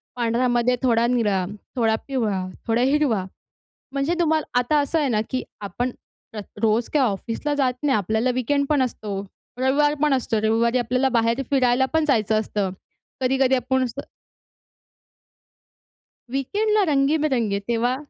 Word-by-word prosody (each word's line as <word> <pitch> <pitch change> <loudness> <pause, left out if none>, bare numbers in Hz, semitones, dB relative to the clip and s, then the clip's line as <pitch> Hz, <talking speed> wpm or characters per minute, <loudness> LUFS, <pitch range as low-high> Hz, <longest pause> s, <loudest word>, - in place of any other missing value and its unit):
पांढरामध्ये 240 +1 +1
थोडा 235 -2 +3
निळा, 210 -7 +1 0.3
थोडा 225 -3 +2
पिवळा, 215 -9 -1 0.2
थोडा 230 +1 +2
हिरवा. 260 -7 +2 0.7
म्हणजे 275 +4 0
तुम्हाला 315 -2 +2
आता 295 +5 +2
असं 290 +3 0
आहे 290 - +1
ना, 215 -2 +1
की 255 - -2 0.2
आपण 245 +5 -3 0.4
प्र 220 - -6 0.2
रोज 225 +1 +1
काय 295 - +3
ऑफिसला 230 +5 -1
जात 260 -3 +1
नाही, 275 -3 +3
आपल्याला 220 +5 0
वीकेंड 280 +3 0
पण 295 -3 +3
असतो, 210 -5 -4 0.4
रविवार 280 +3 +2
पण 300 -2 +3
असतो. 235 -4 0
रविवारी 230 +3 +2
आपल्याला 250 +3 +1
बाहेर 230 +3 +1
फिरायला 260 -1 +3
पण 320 -1 +2
जायचं 220 -5 +2
असतं. 205 -2 -2 0.5
कधी-कधी 265 0 +2
आपण 260 +1 0
अस 240 - -3 2.4
वीकेंडला 420 - +1
रंगीबिरंगे 275 -7 +1
तेव्हा 240 +2 +1
250 Hz, 135 wpm, -23 LUFS, 225-275 Hz, 2.4 s, थोडा